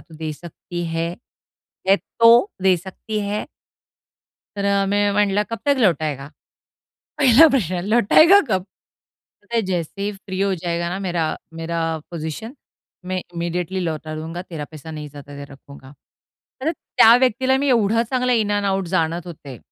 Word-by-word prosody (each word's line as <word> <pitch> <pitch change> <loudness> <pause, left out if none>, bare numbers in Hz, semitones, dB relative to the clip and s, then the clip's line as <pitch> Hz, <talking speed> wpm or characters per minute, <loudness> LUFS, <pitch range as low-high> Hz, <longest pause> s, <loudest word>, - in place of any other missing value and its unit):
तू 165 - -17
दे 155 -1 -4
सकती 175 +2 -8
है? 165 +1 -1 0.8
है 195 - +6
तो 230 - +4 0.2
दे 190 -1 +4
सकती 195 +4 -6
है?" 210 +1 -2 1.1
तर 200 0 -2
अ, 200 0 +2
मी 205 +1 +1
म्हटलं, 205 0 +2
"कब 230 - -4
तक 285 - +4
लौटायेगा?" 155 - +1 0.9
पहिला 275 +4 +7
प्रश्न, 185 - 0
"लौटायेगा 240 - +6
कब?" 185 -3 +1 0.8
म्हणे, 230 +2 -1
"जैसे 185 0 -3
ही 205 +1 -1
फ्री 195 -1 -6
हो 195 -1 +1
जाएगा 170 0 -2
ना 190 +2 -4
मेरा 175 -4 -1 0.3
मेरा 165 +1 -4 0.3
पोझिशन, 170 - -6 0.5
मैं 185 0 -2
इमीडिएटली 175 +2 -2
लौटा 155 -2 -4
दूंगा 165 +3 -6
तेरा 160 -5 -7
पैसा. 155 +1 -10
नहीं 150 -1 -7
ज्यादा 145 0 -11
देर 140 0 -9
रखूंगा." 135 0 -14 0.7
तर 320 +4 +1
त्या 230 -7 +5
व्यक्तीला 260 +1 +2
मी 280 0 0
एवढा 230 -1 +3
चांगला 250 +1 0
इन 215 -3 +1
ॲन्ड 205 -1 0
आउट 190 -2 -1
जाणत 165 +1 -1
होते. 140 -7 -9
190 Hz, 155 wpm, -21 LUFS, 165-220 Hz, 1.1 s, पहिला